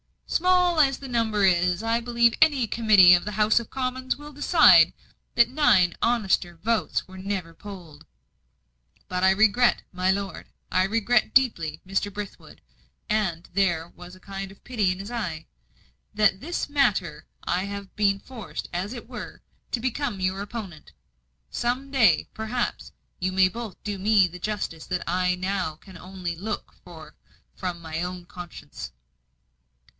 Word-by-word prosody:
"Small 360 -1 +2
as 275 -3 +4
the 270 - -8
number 225 -4 +1
is, 180 +1 +2
I 230 +1 +1
believe 235 -1 +2
any 290 -6 +4
Committee 210 -5 +6
of 175 - +4
the 210 - -4
House 215 +2 +3
of 235 - -9
Commons 260 0 -2
will 295 +1 -11
decide 275 - +6 0.4
that 235 0 +5
nine 245 -11 +4
honester 195 -7 +1
votes 220 +7 -1
were 190 0 -12
never 190 -3 -4
polled. 175 -4 -11 1.0
But 180 0 -2
I - - +6
regret, 220 +5 +3
my 185 0 0
lord 195 0 -2 0.2
I 185 +1 +3
regret 230 +3 +1
deeply, 170 - +2
Mr. 195 +2 -1
Brithwood," 205 0 -9 0.5
and 190 -6 -1
there 175 -4 +1
was 180 +1 -13
a - - -17
kind 195 0 -7
of 195 - -19
pity 215 -7 0
in 185 - -4
his 200 +4 -7
eye 180 -10 -4 0.7
"that 215 -2 +4
in - - -20
this 340 - -3
matter 190 - 0 0.2
I 180 +2 -1
have 200 -1 -7
been 200 -2 +2
forced, 240 0 -8
as 185 +6 -3
it 235 -3 -9
were, 250 - -8 0.3
to 245 - 0
become 245 -4 -2
your 185 +1 -1
opponent. 200 -7 -8 0.6
Some 255 +3 -2
day, 225 - +3
perhaps, 220 +3 -3 0.3
you 185 0 -1
may 185 0 +4
both 230 0 -7
do 205 -2 -4
me 200 -1 +4
the 180 +1 -10
justice 190 -5 -4
that 180 -1 -2
I 180 +1 +1
now 185 -3 -2
can 190 +4 -14
only 180 -2 -6
look 205 +5 -5
for 160 -3 -12 0.4
from 180 -2 -5
my 160 0 -4
own 180 0 -5
conscience." 175 - -9
200 Hz, 160 wpm, -25 LUFS, 180-235 Hz, 1.0 s, Committee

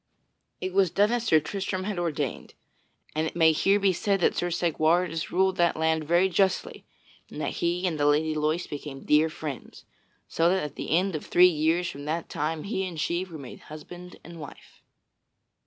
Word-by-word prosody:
So - - -48 0.3
it 185 0 -3
was 190 -2 +3
done 205 +6 +2
as 240 -1 -1
Sir 160 -8 +5
Tristram 190 +3 -4
had 195 -2 -3
ordained. 150 -5 -3 0.6
And 155 +1 0
it - - -7
may 160 -2 +5
here 195 +6 +2
be 195 -2 +3
said 195 +3 0
that - - +2
Sir 175 - -1
Segwarides 165 0 +1
ruled 190 +1 +1
that 170 -2 +2
land 160 0 +1
very 175 +4 +3
justly 190 +1 0 0.4
and - - -8
that - - -3
he 175 +2 0
and 165 -4 -1
the 145 - +3
Lady 155 +2 +2
Loise 155 +3 0
became 145 -2 -8
dear 150 +2 +3
friends, 155 -4 -8 0.4
so 165 +1 +2
that 190 -1 +1
at 150 -2 -5
the - - -6
end 190 -1 0
of 150 - -6
three 180 - +6
years 165 +3 +1
from 145 -4 -7
that 160 +2 -3
time 155 +1 -2
he 200 -2 -2
and 175 -4 -5
she 170 +3 0
were 175 -4 -9
made 135 -4 -10
husband 175 +4 -10
and 170 0 -11
wife. 145 -3 -12
170 Hz, 200 wpm, -26 LUFS, 155-185 Hz, 0.6 s, three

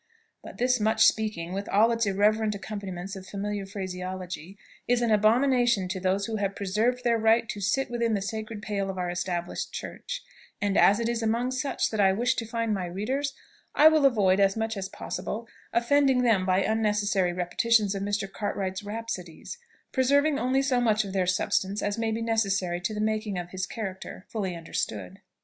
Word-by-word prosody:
But - - -10
this 250 0 +2
"much 220 +1 +4
speaking," 200 -6 +1
with 200 +1 -4
all 220 +4 +4
its 230 -2 +1
irreverent 210 +2 +2
accompaniments 195 -2 -6
of 190 -1 -9
familiar 200 0 -4
phraseology, 185 -2 -6 0.3
is 245 0 +3
an 235 - +1
abomination 240 -1 +3
to 190 0 -3
those 190 +2 0
who 220 0 -3
have 200 -1 -1
preserved 220 +6 0
their 235 -1 +2
right 225 +1 +3
to 205 - -4
sit 240 +7 0
within 235 -2 +1
the 200 - -1
sacred 215 0 -5
pale 200 -2 -2
of 190 - -5
our 180 -1 -2
established 175 0 -3
church; - - -6 0.4
and 200 -1 0
as 205 +2 +5
it 230 - 0
is 235 -1 -1
among 230 +3 0
such 260 +2 -1
that 220 - -3
I 190 -1 +5
wish 235 +5 +1
to 230 - -3
find 230 -1 -1
my 185 -3 -2
readers, 265 +10 -2 0.4
I 310 +2 +8
will 310 -3 +5
avoid, 200 -6 +3
as 195 +1 +3
much 225 0 -1
as 195 -1 -4
possible, 225 +2 -5 0.2
offending 260 +2 +3
them 205 -6 +3
by 185 +1 +3
unnecessary 210 -4 +1
repetitions 195 +4 +2
of 195 - -4
Mr. 205 0 -1
Cartwright's 190 -1 -3
rhapsodies, 205 - -6 0.3
preserving 285 +3 +3
only 265 +2 +1
so 255 -3 +2
much 215 -3 +2
of 195 - -6
their 185 -2 +1
substance 190 +2 0
as 205 +2 -1
may 225 0 0
be 225 +1 -2
necessary 195 -6 0
to 215 +4 -2
the 210 - -2
making 215 -1 -1 0.2
his 185 0 -3
character 190 -3 -6
fully 195 -5 -3
understood. 110 - -4
210 Hz, 185 wpm, -27 LUFS, 190-230 Hz, 0.4 s, I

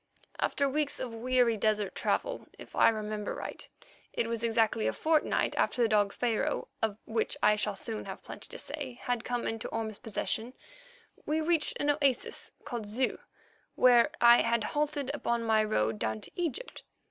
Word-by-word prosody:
After 280 - +1
weeks 290 +1 -1
of 245 -3 -4
weary 240 0 +2
desert 210 -1 +1
travel—if - - -3
I - - +6
remember 215 -1 -3
right, - - -7 0.4
it - - 0
was 230 0 -3
exactly 225 -1 +2
a - - +1
fortnight 315 -1 +1
after 245 - +2
the - - +4
dog 205 -2 +3
Pharaoh, 235 -1 -1
of 215 -2 0
which 225 0 -1
I 210 0 +6
shall 210 -1 -1
soon 220 +2 -4
have - - -8
plenty - - -9
to - - -8
say, 275 -5 -6
had 245 -2 -1
come 245 -1 -2
into 225 0 -3
Orme's 220 -2 -4
possession—we 315 - -5
reached 325 -1 +1
an 290 - +3
oasis 280 -3 0
called 240 -7 -4
Zeu, 245 +5 0 0.6
where 245 0 +6
I 235 0 +8
had 230 -1 +1
halted 290 0 -1
upon 235 -5 -1
my 220 -1 +3
road 110 - 0
down 110 0 -2
to - - -10
Egypt. 355 - -3
235 Hz, 165 wpm, -30 LUFS, 215-280 Hz, 0.6 s, I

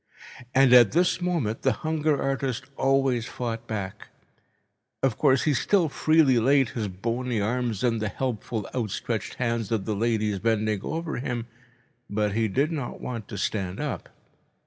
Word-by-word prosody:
And 130 -1 +6
at 120 -5 +7
this 180 +2 +2
moment 160 -12 -1
the 135 - +2
hunger 155 -2 +1
artist 135 -1 -1
always 135 -4 +2
fought 115 -1 -4
back. 100 -1 -5 1.0
Of 130 -5 +2
course, 135 -1 +3
he 155 - +2
still 175 +4 +2
freely 150 -4 +4
laid 135 +1 +3
his 110 -2 -3
bony 115 +5 -2
arms 115 0 -1
in 115 -2 +2
the 105 -1 -1
helpful 115 -3 -3
outstretched 115 -1 -3
hands 115 -3 -1
of 110 -4 0
the 110 - -1
ladies 110 -2 0
bending 110 -1 0
over 165 +6 -3
him, 125 -2 -3 0.6
but 105 0 0
he 110 +1 +1
did 140 - +1
not 140 -7 -4
want 115 -5 -5
to 105 - -7
stand 95 -2 -2
up. - - -4
120 Hz, 155 wpm, -26 LUFS, 110-135 Hz, 1.0 s, at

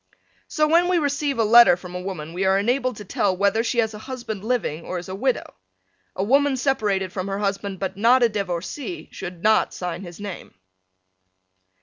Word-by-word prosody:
So 305 -1 +1
when 340 +3 +4
we 360 -1 +2
receive 285 -3 0
a 225 - +3
letter 235 -4 +7
from 180 0 -10
a 180 - -4
woman 170 -4 -6
we 185 +2 -2
are 190 0 +3
enabled 250 +4 0
to 210 - -9
tell 185 0 0
whether 200 +3 +2
she 240 +1 -2
has 220 -2 +1
a 210 - -8
husband 235 -4 -6
living 215 -9 -1
or 185 - -4
is 175 - -7
a - - -5
widow. 255 +6 -1 0.6
A 190 - -1
woman 275 +4 +3
separated 205 -8 0
from 185 0 -3
her 195 0 -2
husband 200 -1 -2
but 190 0 -4
not 240 +4 +4
a 235 - +5
divorcee 205 - -4
should 175 -2 -8
not 215 0 +3
sign 180 -1 -4
his 175 -1 -10
name. 205 -3 -8
205 Hz, 200 wpm, -23 LUFS, 190-250 Hz, 0.6 s, letter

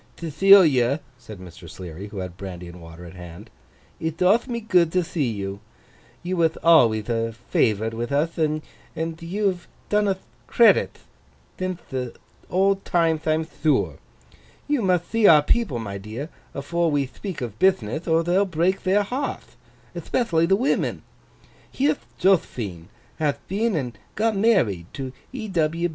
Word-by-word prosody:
'Thethilia,' 155 -6 +5 0.2
said 110 -4 -11
Mr. 90 -2 -12
Sleary, 90 +3 -8
who 105 - -10
had 90 -2 -5
brandy 90 -2 -8
and 85 0 -11
water 85 +1 -11
at 85 - -11
hand, 90 +4 -11 0.5
'it 160 0 -3
doth 200 +8 +3
me 235 -2 -3
good 180 -7 +2
to 180 0 +1
thee 155 -6 -1
you. 100 -2 -5 0.6
You 180 +1 -2
wath 165 -1 +2
alwayth 115 -11 +5
a 115 -1 -1
favourite 110 -1 0
with 120 +3 -4
uth, 155 +4 0
and 160 +1 -4
you've 180 0 -2 0.2
done 210 0 +2
uth 190 -1 -2 0.2
credith 235 -1 +3 0.5
thinth 185 -1 -4
the 125 -2 -4 0.3
old 195 +1 +2
timeth 165 -2 +1
I'm 155 +1 +2
thure. 155 -1 0 0.7
You 290 -4 +1
mutht 180 -3 0
thee 225 -2 +4
our 150 -2 +7
people, 205 - +1
my 100 -4 -5
dear, 110 +10 -7 0.3
afore 170 +5 0
we 145 -2 +1
thpeak 185 +7 -7
of 110 -3 -6
bithnith, 155 - +1
or 165 0 +3
they'll 180 +4 +2
break 180 +2 0
their 195 +2 +2
hearth—ethpethially 230 - -3
the 195 - +5
women. 250 +7 0 0.7
Here'th 285 +2 0
Jothphine 115 - +1 0.3
hath 150 -3 0
been 210 +2 0
and 125 -6 -3 0.2
got 220 +1 +1
married 175 - +2
to 130 -2 -6 0.2
E. 225 -6 -6
160 Hz, 150 wpm, -23 LUFS, -, 0.7 s, our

